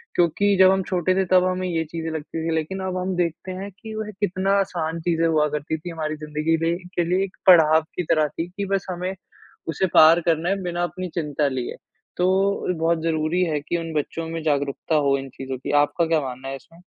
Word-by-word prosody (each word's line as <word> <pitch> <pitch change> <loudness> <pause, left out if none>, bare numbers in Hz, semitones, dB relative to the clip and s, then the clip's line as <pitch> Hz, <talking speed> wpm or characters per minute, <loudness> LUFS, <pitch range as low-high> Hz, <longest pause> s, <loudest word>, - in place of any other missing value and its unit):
क्योंकि 195 +4 +3
जब 190 0 +8
हम 190 0 +2
छोटे 185 0 0
थे 190 - +2
तब 185 -1 +6
हमें 185 0 -1
ये 165 -2 0
चीज़ें 165 -1 -4
लगती 160 +1 -4
थी 165 - 0
लेकिन 160 +5 -2
अब 185 0 -2
हम 185 0 -2
देखते 170 +1 -2
हैं 195 +2 -6
कि 220 +3 -10
वह 215 -1 -4
कितना 195 0 +1
आसान 170 -4 -2
चीज़ें 165 0 +1
हुआ 155 -2 +3
करती 150 +1 -3
थी 165 +3 -8
हमारी 155 -2 -3
ज़िंदगी 155 +2 -1
दे 165 - -2
लिए 175 +1 -3
के 175 - +2
लिए 185 +2 +2
एक 190 - -14
पड़ाव 160 -3 +7
की 180 - -1
तरह 155 -2 +2
थी 165 +3 -5
कि 200 +2 -4
बस 195 - 0
हमें 180 +1 -3 0.5
उसे 175 +3 0
पार 165 +2 +8
करना 165 +2 +1
है 195 0 0
बिना 175 0 -2
अपनी 180 +2 -4
चिंता 150 -3 0
लिए। 130 -2 -4 0.4
तो 180 - +2 0.5
बहुत 165 0 +1
ज़रूरी 165 +2 +1
है 155 -3 -1
कि 170 +3 -2
उन 165 -1 -5
बच्चों 160 +2 -3
में 165 0 -4
जागरूकता 145 +1 0
हो 140 0 +3
इन 135 0 -7
चीज़ों 135 -1 -5
की। 130 - -5
आपका 170 +3 0
क्या 160 -1 +2
मानना 130 0 -6
है 135 - -4
इसमें? 165 +5 -15
165 Hz, 225 wpm, -23 LUFS, 155-185 Hz, 0.5 s, जब